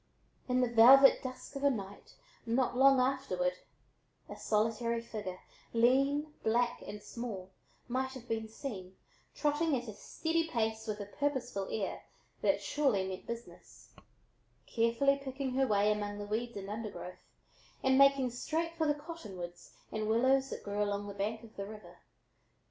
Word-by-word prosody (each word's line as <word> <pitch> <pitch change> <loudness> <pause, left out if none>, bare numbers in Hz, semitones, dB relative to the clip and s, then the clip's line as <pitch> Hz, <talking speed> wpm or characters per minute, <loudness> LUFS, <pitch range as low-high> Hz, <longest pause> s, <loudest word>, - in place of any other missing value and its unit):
In 250 0 +3
the 250 - +3
velvet 265 +4 +8
dusk 255 +2 -7
of 275 - -5
a 280 - +6
night, 200 -6 -6 0.3
not 245 +2 +1
long 270 +1 +6
afterward, 250 -9 0 0.7
a - - -8
solitary 225 +2 0
figure, 210 -5 -6 0.3
lean, 275 +6 +3
black, 240 +2 +1
and 210 0 -7
small, 210 -5 -6 0.4
might 260 +1 -1
have 250 -2 -10
been 225 -1 -2
seen, 205 -6 -7 0.4
trotting 295 0 +1
at 245 0 -6
a 215 - -6
steady 325 +9 -1
pace 220 -3 -1
with 210 -1 -3
a - - -4
purposeful 245 -4 -2
air 205 -3 -3 0.4
that - - +2
surely 250 -11 +1
meant 190 0 -7
business, 235 0 -9 0.7
carefully 240 +5 +2
picking 265 -1 -3
her 265 +1 +2
way 210 -1 +3
among 205 -1 -2
the 205 - -5
weeds 225 +2 -3
and 195 -1 -6
undergrowth 205 -4 -6 0.6
and 265 0 +4
making 275 -2 +5
straight 325 +7 -2
for 320 -2 +1
the 295 - +2
cottonwoods 195 - -8 0.2
and 215 0 -2
willows 265 +4 +3
that - - -6
grew 205 0 -2
along 205 0 -1
the 200 - -6
bank 215 +3 -3
of 225 -1 -14
the 200 - -3
river. 200 -5 -11
235 Hz, 155 wpm, -33 LUFS, 205-270 Hz, 0.7 s, velvet